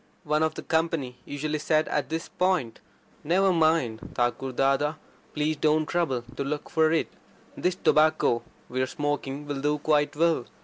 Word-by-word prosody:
One 150 +1 +1
of 160 0 +1
the - - -6
company 160 -6 -1
usually 150 +1 -3
said 155 +1 +2
at 150 - -1
this 165 +1 -3
point: 180 -11 0 0.4
"Never 185 +4 +3
mind, 155 -9 +2 0.2
Thakur 120 +2 0
Dada. 135 +4 +1 0.4
Please 150 +1 0
don't 155 +1 +2
trouble 150 -8 -1
to - - -1
look 145 +1 -4
for 160 -1 +3
it. 165 - +1 0.5
This 180 0 0
tobacco 155 -8 +3 0.3
we're 130 +1 -1
smoking 145 0 -3
will 145 -2 -4
do 150 +1 +1
quite 150 0 +1
well. 160 -5 +2
150 Hz, 160 wpm, -26 LUFS, 135-160 Hz, 0.5 s, Never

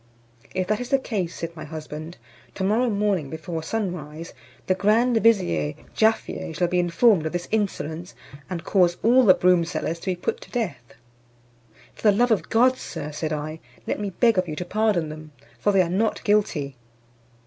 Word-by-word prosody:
"If 185 0 0
that 215 +3 0
is 245 0 -5
the 275 - +4
case," 200 -10 -3
said 165 0 -6
my 155 - -7
husband, 155 +1 -8 0.4
"to 190 - -3
morrow 225 +6 +2
morning, 200 -8 0
before 160 +1 -5
sun 195 +2 -2
rise, 155 0 -8 0.3
the 185 - +2
grand 225 +5 +3
vizier 175 - +2 0.2
Jaaffier 220 -6 +1
shall 175 - +1
be 180 +1 +1
informed 175 0 +3
of 160 - -6
this 175 0 -3
insolence, 180 -5 -2 0.3
and 175 -3 -4
cause 175 -2 +3
all 250 +3 +6
the 185 - +7
broom 180 -1 +4
sellers 165 0 -3
to - - -12
be 185 - +1
put 175 - -3
to - - -12
death." 140 - -4 1.0
"For - - -16
the 200 - +3
love 245 +1 +3
of 220 - +1
God, 255 +3 +4
Sir," 150 - -6
said 155 +1 -3
I, 155 +1 -4 0.3
"let - - -2
me 205 -1 -2
beg 225 +2 +3
of 180 - -1
you 155 - -4
to 180 - -4
pardon 205 -5 +1
them, 155 0 -10 0.3
for 205 - +2
they 195 -2 +4
are - - -2
not 200 +6 0
guilty." 155 -10 +1
180 Hz, 190 wpm, -24 LUFS, 160-215 Hz, 1.0 s, the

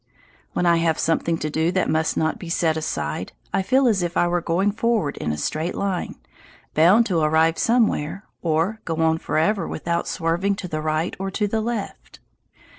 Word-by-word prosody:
When 180 - 0
I 170 -1 +4
have 165 -1 +1
something 165 0 0
to 155 -1 -3
do 160 +3 +1
that 185 - +1
must 160 +1 0
not 160 +6 0
be 175 -5 -8
set 165 -2 +1
aside, 75 - -3 0.2
I 195 - +2
feel 260 +6 +3
as 210 -5 +2
if 175 -1 -2
I 175 - +3
were 175 0 0
going 180 +5 +1
forward 215 -8 0
in 75 - -2
a 75 - -3
straight 155 - -2
line, 195 -3 -2 0.6
bound 185 +9 +5
to 180 -6 +1
arrive 160 +1 +2
somewhere, 205 -7 +1 0.2
or 170 +7 0
go 165 - -3
on 160 0 +2
forever 190 +4 0
without 170 +2 -2
swerving 175 +4 0
to 195 - -6
the 155 -2 -3
right 155 +2 -1
or 195 0 -2
to 205 +2 -1
the 220 +2 -1
left. 225 -2 -5
170 Hz, 190 wpm, -23 LUFS, 160-200 Hz, 0.6 s, bound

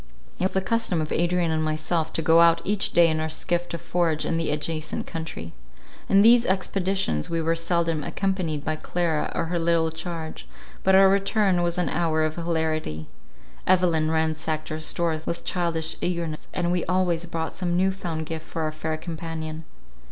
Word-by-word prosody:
It 180 - +1
was 190 - 0
the 190 - +1
custom 190 -3 0
of 155 -1 -3
Adrian 175 0 +1
and 155 0 0
myself 155 +1 -1
to 160 - 0
go 165 +1 +6
out 170 0 +6
each 205 0 +2
day 170 -1 +6
in 155 -1 0
our 160 0 -2
skiff 175 +2 -1
to 170 - -3
forage 165 -2 0
in 165 - 0
the 165 - -1
adjacent 155 +1 -2
country. 160 - -6 0.6
In 200 0 +6
these 235 +1 +7
expeditions 190 - 0
we 165 - -1
were 165 +1 +1
seldom 165 -2 0
accompanied 180 -7 -2
by 155 0 -1
Clara 165 -2 -1
or 165 - 0
her 170 +1 -1
little 165 -1 +2
charge, 160 0 -6 0.3
but 190 0 +4
our 195 0 +8
return 195 -1 +2
was 175 0 0
an 180 - 0
hour 160 -2 +1
of 155 0 -2
hilarity. 160 - -2 0.6
Evelyn 175 -4 +3
ransacked 160 -1 -1
our 155 - -3
stores 160 0 -1
with 170 - -3
childish 170 -3 -1
eagerness, 170 -3 -2
and 175 -1 -1
we 180 -1 0
always 175 -2 +1
brought 165 -1 -3
some 175 -2 -1
new 190 +1 +3
found 170 -4 -4
gift 160 0 -6
for 165 - -3
our 155 - -1
fair 155 0 -3
companion. 160 -1 -6
165 Hz, 185 wpm, -25 LUFS, 160-180 Hz, 0.6 s, our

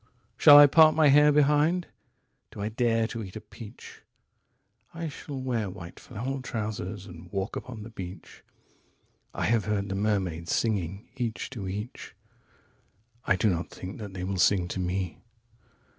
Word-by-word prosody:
122Shall 145 - +10
I 145 - +11
part 155 +2 +6
my 155 -2 +5
hair 150 +2 +6
behind? 150 +4 +3 0.6
Do - - -12
I 105 +1 -2
dare 115 0 +1
to 115 0 -5
eat 95 -2 -10
a - - -4
peach?123I 130 +8 -12
shall 140 -1 -7
wear 120 -6 -2
white 90 -2 -10
flannel 130 +3 -5
trousers, 105 -4 -4
and 90 -2 -12
walk 100 +2 -3
upon 115 -4 -7
the 115 - -10
beach.124I 90 -4 -10
have 110 -3 +2
heard 100 -2 -1
the - - -2
mermaids 95 -5 -1
singing, 100 -2 -2
each 120 -1 -3
to 110 -8 -6
each.125I 110 +1 -7
do 105 +1 +2
not 85 0 -3
think 90 +4 -8
that 100 -3 -8
they 90 - -4
will 95 0 -3
sing 90 0 +3
to 95 - -4
me. 90 -1 -2
105 Hz, 150 wpm, -27 LUFS, 95-125 Hz, 0.6 s, I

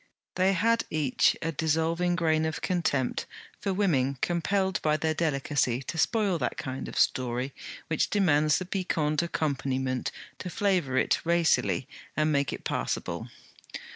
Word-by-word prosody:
They 190 +1 +3
had 230 +4 +2
each 150 -5 +2
a 165 - 0
dissolving 165 +3 +1
grain 160 -3 +2
of 160 -1 -3
contempt 155 -8 0 0.3
for 200 - -1
women 140 -9 +1
compelled 190 +4 0
by 155 0 +2
their 160 +1 0
delicacy 140 -5 0
to 165 - -5
spoil 205 -6 +2
that 125 - -2
kind 130 0 -5
of - - -7
story 125 +1 +1 0.3
which 155 - 0
demands 155 -7 +3
the 185 - -4
piquant 165 -5 0
accompaniment 135 -6 -1 0.3
to 180 - -5
flavour 180 -9 +1
it - - +2
racily 170 -5 +2 0.3
and 155 0 +2
make 140 -2 +1
it - - -6
passable. - - -3
160 Hz, 140 wpm, -28 LUFS, 140-180 Hz, 0.3 s, They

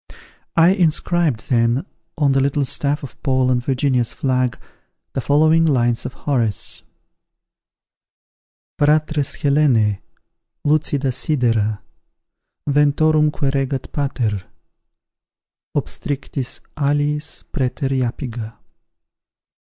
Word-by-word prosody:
I 165 +1 +6
inscribed 170 - +1
then, 120 +5 +2 0.3
on 145 -3 +3
the 135 - +3
little 140 +1 +1
staff 145 +3 -1
of 135 - -10
Paul 130 -2 +2
and 125 -1 +1
Virginia's 130 -2 +1
flag, 130 -2 0 0.6
the 135 - -1
following 155 +4 +4
lines 120 -6 +1
of 125 - -9
Horace: 115 - -1 2.0
Fratres 150 -1 +2
Helenae, 130 -9 +3 0.6
lucida 145 -2 +1
sidera, 115 -7 +1 0.9
Ventorumque 150 0 +3
regat 135 -1 -2
pater, 120 -9 -1 1.3
Obstrictis, 135 -2 -3
aliis, 145 +1 -1
praeter 135 -1 -1
Iapiga. 120 -3 -3
140 Hz, 85 wpm, -20 LUFS, 125-150 Hz, 2.0 s, I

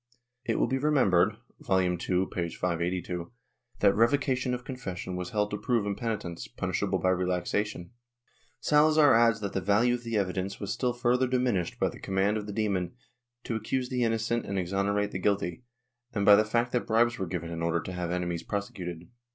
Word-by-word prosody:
It - - 0
will - - +3
be 130 - -1
remembered 105 -9 +3 0.2
(Vol. 95 -1 +1
II, 90 -1 +1
p. 90 -1 -1
582) 90 0 -2 0.5
that 100 -1 +5
revocation 130 +1 +2
of 125 - -8
confession 95 -9 -5
was 90 0 -4
held 105 -1 0
to 105 - -3
prove 120 -4 +1
impenitence, 100 - -3
punishable - - -1
by 95 - +1
relaxation. 90 +1 -1 0.7
Salazar 150 -1 +5
adds 115 -1 +4
that 100 -2 -3
the 95 - -1
value 105 +6 +3
of 120 - -2
the 115 -2 -2
evidence 95 0 -2
was 100 -1 -3
still 125 -2 0
further 120 +1 +2
diminished 125 -9 0
by - - +3
the - - -11
command 95 +2 +1
of 105 -1 -5
the - - -4
demon 100 -3 -1 0.5
to 115 - -3
accuse 125 +3 -2
the 125 -1 -1
mnocent 115 0 0
and 100 - -2
exonerate 100 +3 0
the 95 - -4
guilty, 100 -2 0 0.5
and 100 -3 0
by 105 - +9
the 110 +1 +3
fact 120 +3 0
that 125 - -1
bribes 120 +1 +2
were 95 - -2
given 85 -1 -4
in 85 0 -4
order 85 0 +1
to 90 - -6
have 90 -1 -3
enemies 85 -1 -2
prosecuted. 90 -4 -5
100 Hz, 185 wpm, -28 LUFS, 90-120 Hz, 0.7 s, by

